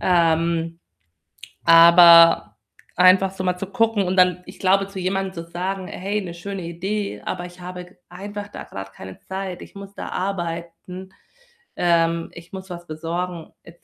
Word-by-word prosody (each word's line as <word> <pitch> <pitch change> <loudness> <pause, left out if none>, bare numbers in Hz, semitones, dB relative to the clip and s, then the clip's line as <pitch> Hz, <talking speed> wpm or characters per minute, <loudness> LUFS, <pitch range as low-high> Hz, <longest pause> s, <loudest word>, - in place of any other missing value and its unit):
Ähm, 165 -1 +1 0.9
aber 170 0 +7 0.4
einfach 185 +1 +5
so 190 -1 -6
mal 180 -1 0
zu 195 - -5
gucken 225 -1 +1
und 185 +1 -2
dann 180 -1 +4
ich 185 - -12
glaube, 195 +1 +2
zu 195 -1 -11
jemandem 190 +1 -2
zu 165 -1 -8
sagen: 185 +2 -4
„Hey, 205 +3 -3
'ne 175 -3 -7
schöne 195 +2 -7
Idee, 175 - -4
aber 180 -1 -4
ich 175 +1 -13
habe 180 0 -8
g 180 - -19 0.2
einfach 205 +3 -7
da - - -9
grad 95 0 -9
keine 95 0 -11
Zeit. 190 -1 -6
Ich - - -13
muss 200 0 -10
da - - -7
arbeiten. 180 0 -5 0.7
Ähm, 170 -1 +1
ich 170 +2 -14
muss 190 0 -8
was 175 -1 -9
besorgen,“ 170 +2 -5
et 170 0 -17
180 Hz, 165 wpm, -22 LUFS, 170-190 Hz, 0.9 s, aber